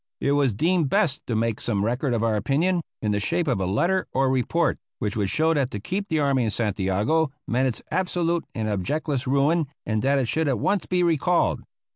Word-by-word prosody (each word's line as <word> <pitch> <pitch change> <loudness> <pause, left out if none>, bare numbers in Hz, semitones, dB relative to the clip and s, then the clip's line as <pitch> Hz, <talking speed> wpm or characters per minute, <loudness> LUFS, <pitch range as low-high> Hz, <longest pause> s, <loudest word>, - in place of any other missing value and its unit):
It 140 - 0
was 140 -3 +3
deemed 165 - +1
best 180 -8 0
to 115 - -1
make 115 0 -1
some 105 -3 0
record 125 +2 0
of 115 - -1
our 115 -1 +1
opinion, 160 - +1 0.2
in 105 - +1
the 105 - +1
shape 165 - 0
of 125 -8 0
a 95 - 0
letter 175 - +1
or 135 0 +2
report, 145 +6 +1 0.2
which 105 -1 -3
would 100 -3 0
show 160 +6 +2
that 140 -5 0
to 105 - -5
keep 195 - -3
the 160 - +1
army 140 -3 +2
in 110 - 0
Santiago 105 - 0 0.2
meant 130 +3 +1
its 125 - -3
absolute 175 -1 0
and 110 -1 -2
objectless 130 - -2
ruin, 145 +4 +2 0.2
and 110 -1 -1
that 140 +2 +2
it 130 -3 0
should 160 +5 0
at 135 -4 +1
once 200 - 0
be 180 -1 +1
recalled. 170 +1 +2
135 Hz, 215 wpm, -24 LUFS, 110-165 Hz, 0.2 s, was